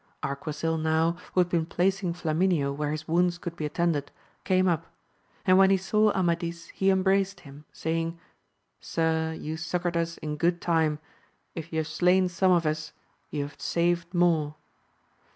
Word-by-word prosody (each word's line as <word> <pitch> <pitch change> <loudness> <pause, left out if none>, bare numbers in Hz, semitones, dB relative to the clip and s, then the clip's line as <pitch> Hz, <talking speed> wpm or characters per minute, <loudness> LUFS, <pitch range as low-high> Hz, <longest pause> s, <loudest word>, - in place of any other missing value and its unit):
Arquisil 155 +3 -2
now, 160 +2 +2 0.2
who 185 - +4
had 175 - 0
been 165 -2 0
placing 190 +1 0
Flamineo 165 -3 +1
where 150 0 -2
his 155 +1 -4
wounds 175 +1 +2
could 175 -1 -6
be 155 -3 -2
attended, 150 -3 0 0.3
came 185 -1 +2
up; 165 -2 0 0.6
and 185 0 +6
when 190 0 +7
he 195 - +4
saw 210 +3 +2
Amadis 170 -2 -1
he 195 - +1
embraced 195 +1 +2
him, 145 +1 -13
say 160 +1 -2
ing, 165 +1 -4 0.6
Sir, 160 0 0
you 155 +1 -4
succoured 175 +1 -2
us 170 0 -1
in 150 -1 -4
good 170 +3 +1
time; 160 -3 +1 0.6
if 165 0 -7
you 160 - -3
have 160 -1 0
slain 180 +2 +3
some 185 +1 +2
of 170 -2 +3
us, 155 0 -2 0.4
you 145 -2 -2
have 145 +1 -10
saved 170 0 0
more. 165 -4 +2
170 Hz, 170 wpm, -27 LUFS, 160-180 Hz, 0.6 s, when